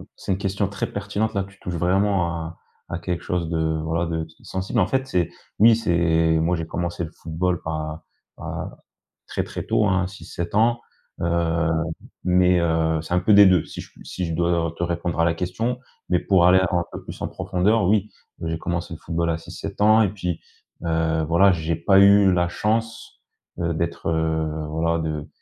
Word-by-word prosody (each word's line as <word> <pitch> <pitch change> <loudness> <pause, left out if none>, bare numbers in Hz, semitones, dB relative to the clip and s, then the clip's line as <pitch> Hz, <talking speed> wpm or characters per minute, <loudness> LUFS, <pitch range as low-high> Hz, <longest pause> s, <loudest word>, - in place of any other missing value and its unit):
C'est - - -5
une 95 - +1
question 100 +1 -1
très 100 - -3
pertinente. 105 +2 -2
Là, 100 -1 0
tu 95 0 -15
touches 90 - -5
vraiment 95 +2 +2
à 80 0 -6 0.3
à 85 - -2
quelque 85 0 -3
chose 85 -2 -2
de, 80 -1 0
voilà 85 +1 -1
de 80 -1 -2 0.2
sensible. 95 +5 -2
En 90 - +3
fait, 135 0 0
c'est, 90 - 0 0.3
oui, 115 +1 +7
c'est 80 -5 +2
moi 85 +2 +1
j'ai 80 -1 -3
commencé 85 +1 -3
le 80 - -6
football 85 +2 -2
à 80 0 -4 0.4
à - - -5 0.6
très - - -2
très - - -6
tôt, 110 - +2
hein, 95 -1 +1
6-7 95 -1 -6
ans, 120 +2 +3 0.4
heu, 85 -1 +1 0.5
mais, 90 0 +4
heu, 80 -1 +1
c'est 85 - -4
un 90 - +4
peu 100 +4 +3
des 100 0 +9
2. 90 -4 +5
Si - - -10
j - - -13
si 90 - -4
je 80 - -3
dois 85 -1 0
te 85 - -2
répondre 85 0 -2
à 85 - +4
la 85 -1 +1
question, 110 +9 -2 0.3
mais 90 - +3
pour 95 -3 +3
aller 95 +1 +6
un 90 -1 +1
peu - - -8
plus - - -9
en - - -1
profondeur, 100 +4 +1
oui 105 0 +2 0.3
j'ai 80 0 -2
commencé 85 0 -3
le - - -12
football 85 0 -2
à 80 - 0
6-7 90 +4 -8
ans 110 +1 +6
et 105 - +3
puis, 90 -4 -4 0.4
heu, 80 -1 0
voilà 95 +4 +5
j'ai 85 -1 -1
pas 95 +4 +4
eu 100 -1 +6
la 85 -1 +1
chance, 115 +7 -2 0.4
heu, 85 -1 0
d'être, 85 0 -2
heu, 80 -1 0 0.2
voilà 85 +2 0
de, 75 -2 -3
85 Hz, 195 wpm, -23 LUFS, 80-95 Hz, 0.6 s, des